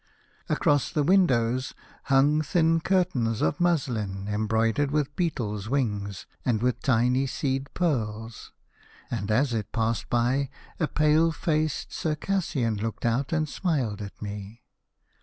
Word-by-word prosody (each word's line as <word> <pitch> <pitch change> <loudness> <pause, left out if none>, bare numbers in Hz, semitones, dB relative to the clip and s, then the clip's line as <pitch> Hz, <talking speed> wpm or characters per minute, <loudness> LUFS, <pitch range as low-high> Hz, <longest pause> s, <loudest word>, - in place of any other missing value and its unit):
Across 145 -3 +2
the 150 -3 +2
windows 130 -8 +2 0.3
hung 145 +3 +4
thin 165 +1 +2
curtains 165 - +1
of 80 - +1
muslin 115 - 0
embroidered 110 +5 +1
with 145 -1 -1
beetles' 110 - -2
wings 105 -8 -1 0.2
and 120 -4 +1
with 125 +2 0
tiny 125 +1 +2
seed 135 +1 -2
pearls, 115 -9 -2 0.6
and 105 -3 -3
as 125 +4 +2
it 110 -3 -3
passed 115 -1 -1
by 125 +3 +1 0.3
a 160 - +1
pale 155 +3 +3
faced 155 -3 -1
Circassian 150 - -1
looked 115 +2 -4
out 125 +4 0
and 155 -1 +1
smiled 135 - -1
at 100 -1 -8
me. 105 +2 -7
130 Hz, 125 wpm, -26 LUFS, 110-150 Hz, 0.6 s, hung